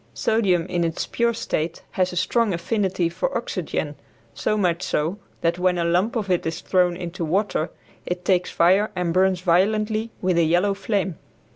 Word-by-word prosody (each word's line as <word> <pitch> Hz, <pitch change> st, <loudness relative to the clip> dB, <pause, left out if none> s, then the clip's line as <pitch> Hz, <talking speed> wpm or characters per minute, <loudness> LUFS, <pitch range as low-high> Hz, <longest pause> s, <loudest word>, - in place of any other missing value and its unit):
Sodium 180 Hz, -, +2 dB
in 175 Hz, -1 st, -1 dB
its 165 Hz, -1 st, -1 dB
pure 235 Hz, 0 st, +1 dB
state 170 Hz, -7 st, -3 dB
has 185 Hz, -1 st, 0 dB
a -, -, -7 dB
strong 205 Hz, +4 st, +1 dB
affinity 190 Hz, 0 st, 0 dB
for -, -, -2 dB
oxygen, -, -, -3 dB, 0.4 s
so 215 Hz, -, 0 dB
much 180 Hz, -4 st, +1 dB
so 165 Hz, +6 st, -1 dB, 0.2 s
that 170 Hz, +1 st, +1 dB
when 180 Hz, 0 st, +2 dB
a 170 Hz, -, 0 dB
lump 180 Hz, +8 st, +1 dB
of 205 Hz, -5 st, -1 dB
it 180 Hz, -, +2 dB
is 165 Hz, +1 st, -3 dB
thrown 180 Hz, -2 st, +2 dB
into 175 Hz, 0 st, -5 dB
water 175 Hz, 0 st, 0 dB, 0.3 s
it 180 Hz, 0 st, -4 dB
takes 180 Hz, -2 st, +2 dB
fire 190 Hz, +5 st, +3 dB
and 180 Hz, -2 st, -1 dB
burns 185 Hz, 0 st, +3 dB
violently 215 Hz, +5 st, +2 dB
with 180 Hz, -2 st, +1 dB
a -, -, +4 dB
yellow 175 Hz, +5 st, +2 dB
flame. 195 Hz, -3 st, -2 dB
180 Hz, 175 wpm, -23 LUFS, 170-205 Hz, 0.4 s, a